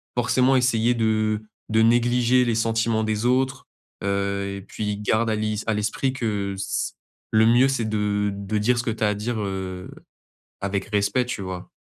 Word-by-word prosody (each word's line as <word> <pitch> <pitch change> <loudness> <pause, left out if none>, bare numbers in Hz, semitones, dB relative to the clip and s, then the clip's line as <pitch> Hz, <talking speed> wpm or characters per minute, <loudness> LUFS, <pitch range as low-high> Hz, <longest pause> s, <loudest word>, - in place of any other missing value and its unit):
forcément 125 +2 +3
essayer 120 -2 +3
de 110 -2 +1 0.3
de 110 0 +3
négliger 120 +2 +3
les 115 - +1
sentiments 115 0 +1
des 110 +1 -1
autres, 130 +2 +1 0.4
heu, 100 0 -1
et - - -8
puis 105 +1 -4
garde 110 +2 +1
à 110 - +1
l'is 105 0 -2
à 110 - +2
l'esprit 110 +5 -1
que 105 -6 -2
ce 100 - -2 0.4
le 110 0 +5
mieux 120 +3 +5
c'est 135 -4 0
de 105 -1 0
de 100 +2 -3
dire 120 +4 +2
ce 120 - 0
que 125 - -2
tu 110 0 -3
as 105 - +4
à - - +1
dire, 110 +3 -3
heu, 95 -2 -4 0.7
avec 100 0 -2
respect, 105 +4 +1
tu 115 -5 -4
vois? 95 -1 -6
110 Hz, 185 wpm, -24 LUFS, 105-120 Hz, 0.7 s, le